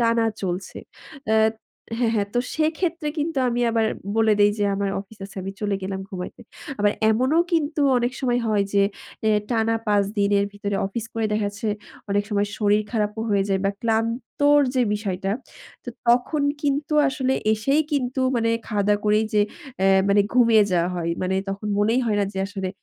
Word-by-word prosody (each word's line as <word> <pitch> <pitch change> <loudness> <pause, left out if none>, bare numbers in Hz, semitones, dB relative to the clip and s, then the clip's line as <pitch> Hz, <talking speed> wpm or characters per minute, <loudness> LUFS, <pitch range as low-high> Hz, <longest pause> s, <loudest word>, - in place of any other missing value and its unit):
টানা 230 -1 +3 0.2
চলছে। 185 +1 -4 0.5
অ্যা 220 - +4 0.6
হ্যাঁ, 230 -2 +1
হ্যাঁ। 200 -1 0
তো - - +2 0.2
সেক্ষেত্রে 320 +1 -1
কিন্তু 300 -1 -1
আমি 240 0 -1
আবার 225 -1 +2 0.3
বলে 225 -1 +4
দেই 205 - +6
যে, 205 - +1
"আমার 200 0 -1
অফিস 205 +2 -14
আছে, 200 - -12
আমি 195 - -5
চলে 205 -1 0
গেলাম 190 0 -3
ঘুমাইতে।" 185 +4 -7 0.4
আবার 205 0 +3 0.2
এমন 250 +5 +1 0.2
কিন্তু 305 -2 +1 0.2
অনেক 240 +1 -1
সময় 245 -2 +1
হয় 210 -2 +2
যে, 200 - +5 0.4
অ্যা 215 -1 +3
টানা 225 -1 +1
৫ 205 -1 +3
দিনের 200 0 +3
ভিতরে 205 -1 -3
অফিস 215 +3 -4
করে 225 -1 0
দেখাচ্ছে, 205 0 -2 0.4
অনেক 205 0 +2
সময় 205 0 +1
শরীর 210 0 +3
খারাপও 215 0 -1
হয়ে 200 -1 +2
যায় 195 -1 +1
বা 195 - +3
ক্লান্তর 235 +6 +2
যে 255 - +3
বিষয়টা। 195 -2 -3 0.5
তো - - -8 0.2
তখন 250 +5 +3 0.2
কিন্তু 290 +1 0
আসলে 265 -2 -1 0.2
এসেই 275 +8 +2
কিন্তু, 260 -2 -1 0.2
মানে 230 0 +1 0.2
খাওয়া-দাওয়া 205 -1 +1
করেই 210 +1 +3
যে, 210 - +5 0.4
অ্যা 195 - +4 0.2
মানে 200 +1 +5
ঘুমিয়ে 230 -3 +6
যাওয়া 175 0 +2
হয়। 170 -1 -2
মানে 185 +1 0
তখন 200 +2 -4
মনেই 225 +5 +2
হয় 210 - +1
না 200 - +2
যে, 190 - -5
আসলে 195 -2 -4
215 Hz, 175 wpm, -23 LUFS, 200-245 Hz, 0.6 s, দেই